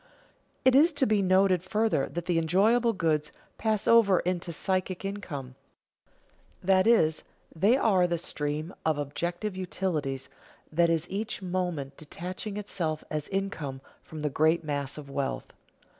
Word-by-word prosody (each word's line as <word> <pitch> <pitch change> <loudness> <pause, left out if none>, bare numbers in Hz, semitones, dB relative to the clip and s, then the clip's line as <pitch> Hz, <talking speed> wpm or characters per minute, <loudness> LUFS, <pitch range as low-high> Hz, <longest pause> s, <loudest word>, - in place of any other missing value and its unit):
It 260 - +6
is 315 +6 +6
to 285 -2 +2
be 215 -3 +2
noted 185 -1 +3
further 210 -6 +1
that 175 0 -5
the 175 -2 +2
enjoyable 215 +9 +3
goods 155 -6 0 0.3
pass 215 -2 0
over 215 -5 +6
into 180 -1 -2
psychic 185 +2 -2
income, 155 -10 -5 1.1
that 190 +2 +4
is, 160 -10 +4 0.3
they 205 +10 +4
are 190 -8 +3
the 170 -1 0
stream 155 +1 -3
of 160 -2 +1
objective 175 +7 -3
utilities 155 -8 -2 0.4
that 170 +2 +3
is 165 0 0
each 205 +1 -4
moment 175 -7 -3
detaching 185 +6 -6
itself 170 -7 -3
as 150 -1 -3
income 180 -9 -3 0.2
from 155 -1 -9
the 150 -1 -1
great 160 +4 +2
mass 145 -2 -2
of 150 -2 -8
wealth. 140 -1 -3
175 Hz, 145 wpm, -28 LUFS, 155-195 Hz, 1.1 s, It